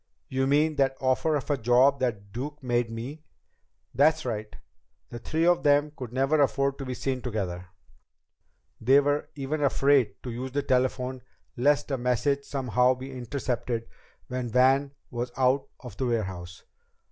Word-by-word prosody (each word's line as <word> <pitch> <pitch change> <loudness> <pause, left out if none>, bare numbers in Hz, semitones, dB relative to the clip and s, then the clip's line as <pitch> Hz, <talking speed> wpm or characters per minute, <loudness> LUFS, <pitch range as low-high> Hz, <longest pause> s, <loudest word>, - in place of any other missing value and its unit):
"You 130 0 0
mean 150 +2 +2
that 135 -1 +2
offer 135 +4 +1
of 145 +1 -2
a 145 - +1
job 125 +4 +4
that 105 -6 -2
Duke 145 +4 -6
made 120 -2 0
me?" 125 +7 -7 0.7
"That's 155 +4 +3
right. 110 -3 -3 0.6
The 120 - -6
three 160 +7 -1
of 175 0 +4
them 145 0 +3
could 125 -5 -7
never 135 +4 +2
afford 140 0 +1
to 135 - -4
be 130 - -3
seen 130 -1 -2
together. 95 -7 -4 1.1
They 130 +5 +5
were 145 +1 0
even 145 +2 -3
afraid 135 -5 +3
to 125 - -5
use 130 +2 -5
the 145 0 0
telephone, 130 0 0 0.3
lest 145 +3 +2
a 135 - -1
message 130 +3 0
somehow 125 -1 +2
be 130 +1 -8
intercepted 125 -2 -3 0.4
when 125 -1 -4
Van 135 +4 +3 0.2
was 120 0 -3
out 130 +1 +2
of 120 -6 -10
the 130 - -1
warehouse. 95 -6 -3
130 Hz, 160 wpm, -27 LUFS, 120-140 Hz, 1.1 s, They